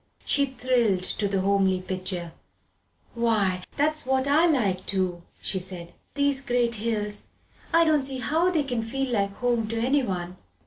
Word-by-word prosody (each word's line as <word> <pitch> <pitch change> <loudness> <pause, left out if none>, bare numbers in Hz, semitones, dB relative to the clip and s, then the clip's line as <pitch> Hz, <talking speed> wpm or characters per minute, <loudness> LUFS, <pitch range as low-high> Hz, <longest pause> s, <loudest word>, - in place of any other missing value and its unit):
She 280 -1 +3
thrilled 245 -7 +1
to 205 +2 -2
the 195 -1 0
homely 195 -1 +2
picture. 185 -2 -4 0.8
"Why, 215 -6 +1 0.2
that's 305 +1 +2
what 265 0 +1
I 300 +5 +4
like 205 - +1
too!" 185 -3 -1 0.2
she 190 - -1
said. 180 -2 -8 0.2
"These 285 -1 +2
great 240 -2 +1
hills 210 -2 -2 0.4
I 335 0 +5
don't 310 -2 +3
see 265 0 0
how 315 +9 +1
they 325 -5 +1
can 245 -4 -2
feel 265 +3 -3
like 200 -2 0
home 240 -3 0
to 230 +1 -3
anyone. 195 -9 0
230 Hz, 155 wpm, -26 LUFS, 190-270 Hz, 0.8 s, I